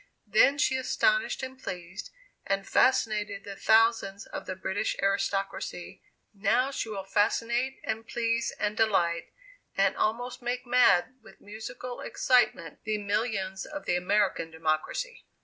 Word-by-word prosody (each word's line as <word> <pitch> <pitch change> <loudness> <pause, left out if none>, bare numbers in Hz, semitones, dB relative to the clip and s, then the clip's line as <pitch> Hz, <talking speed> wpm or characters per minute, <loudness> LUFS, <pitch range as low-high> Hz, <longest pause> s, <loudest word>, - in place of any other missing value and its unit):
Then 280 - +4
she 265 -2 +2
astonished, - - +1
and 260 0 -7
pleased, 180 0 -6 0.3
and 195 0 -1
fascinated 210 -5 +2
the 200 -1 -7
thousands 220 -2 +3
of - - -7
the 185 - -3
British 190 +2 -2
aristocracy; 195 -2 -2 0.3
now 225 +7 +1
she 230 - -3
will 200 -3 -4
fascinate, 235 +6 0
and 225 +1 -3
please, 230 0 0
and 210 0 0
delight, 175 -7 +1 0.5
and - - +3
almost 245 +3 -1
make 245 +1 -3
mad 245 -2 +4
with 220 - -17
musical 220 +4 -7
excitement, 240 - +1
the 215 -1 -1
millions 200 -2 -2
of 295 -1 -7
the 175 - +1
American 185 -1 +1
democracy. 160 - -2
215 Hz, 130 wpm, -28 LUFS, 195-245 Hz, 0.5 s, Then